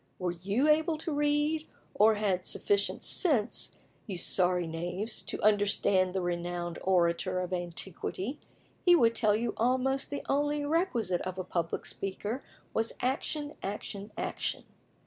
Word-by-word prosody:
Were 180 Hz, -1 st, -1 dB
you 200 Hz, -, 0 dB
able 310 Hz, +1 st, +3 dB
to 315 Hz, 0 st, -3 dB
read, 295 Hz, +2 st, +1 dB, 0.3 s
or 215 Hz, +1 st, +5 dB
had 205 Hz, -3 st, +1 dB
got 180 Hz, -, -15 dB
sufficient 200 Hz, 0 st, +1 dB
sense, 255 Hz, -, +2 dB, 0.3 s
you 195 Hz, -4 st, -4 dB
sorry 180 Hz, 0 st, +2 dB
knaves, 175 Hz, +7 st, -3 dB
to -, -, -4 dB
understand 200 Hz, -3 st, +3 dB
the 190 Hz, -, +1 dB
renowned 175 Hz, 0 st, -3 dB
orator 175 Hz, -1 st, +2 dB
of 180 Hz, 0 st, -3 dB
antiquity, 185 Hz, -, -3 dB, 0.4 s
he 355 Hz, -1 st, +7 dB
would 230 Hz, -8 st, +4 dB
tell 215 Hz, -3 st, +3 dB
you 230 Hz, +1 st, -1 dB
almost 260 Hz, +3 st, +1 dB
the 285 Hz, -, -4 dB
only 290 Hz, +1 st, +1 dB
requisite 285 Hz, -, +1 dB
of 185 Hz, 0 st, -4 dB
a 185 Hz, -, -2 dB
public 170 Hz, -2 st, -2 dB
speaker 205 Hz, +6 st, -4 dB, 0.3 s
was 225 Hz, +1 st, 0 dB
ACTION, 290 Hz, +3 st, -1 dB
ACTION, 200 Hz, +1 st, -5 dB
ACTION. -, -, -2 dB
205 Hz, 145 wpm, -30 LUFS, 180-275 Hz, 0.4 s, he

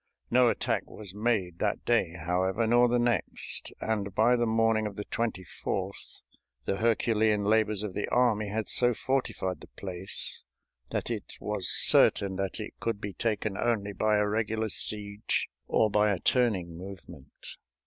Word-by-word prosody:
No 125 Hz, 0 st, +5 dB
attack -, -, -1 dB
was 100 Hz, -4 st, -9 dB
made 105 Hz, -6 st, -1 dB
that 105 Hz, -, -1 dB
day, 110 Hz, -8 st, +2 dB
however, 90 Hz, +6 st, 0 dB
nor 120 Hz, +2 st, +5 dB
the 120 Hz, -, +2 dB
next, 120 Hz, -5 st, -1 dB
and 100 Hz, -3 st, -2 dB
by 120 Hz, +3 st, +4 dB
the 120 Hz, -1 st, +1 dB
morning 110 Hz, -1 st, +2 dB
of 100 Hz, -, -7 dB
the 105 Hz, -, -5 dB
24th 95 Hz, -3 st, -4 dB, 0.4 s
the 95 Hz, -, -1 dB
Herculean 110 Hz, -2 st, +2 dB
labors 105 Hz, 0 st, +2 dB
of 105 Hz, -3 st, -4 dB
the 105 Hz, -, -2 dB
army 115 Hz, -4 st, +2 dB
had 110 Hz, +1 st, -2 dB
so 120 Hz, -1 st, +3 dB
fortified 100 Hz, -, -2 dB
the -, -, -12 dB
place 95 Hz, -1 st, -5 dB, 0.5 s
that -, -, -3 dB
it -, -, -5 dB
was 105 Hz, -3 st, 0 dB
certain 95 Hz, -1 st, +4 dB
that 95 Hz, +1 st, -3 dB
it 110 Hz, -, -6 dB
could 115 Hz, -3 st, -2 dB
be 100 Hz, -1 st, -5 dB
taken 105 Hz, 0 st, -1 dB
only 105 Hz, -3 st, 0 dB
by 105 Hz, +2 st, +2 dB
a 105 Hz, -, +2 dB
regular 110 Hz, +1 st, -1 dB
siege 105 Hz, 0 st, -2 dB, 0.2 s
or 110 Hz, -, +2 dB
by 105 Hz, 0 st, +3 dB
a 100 Hz, -, 0 dB
turning 95 Hz, -10 st, +1 dB
movement. 95 Hz, 0 st, -11 dB
105 Hz, 160 wpm, -29 LUFS, 100-115 Hz, 0.5 s, No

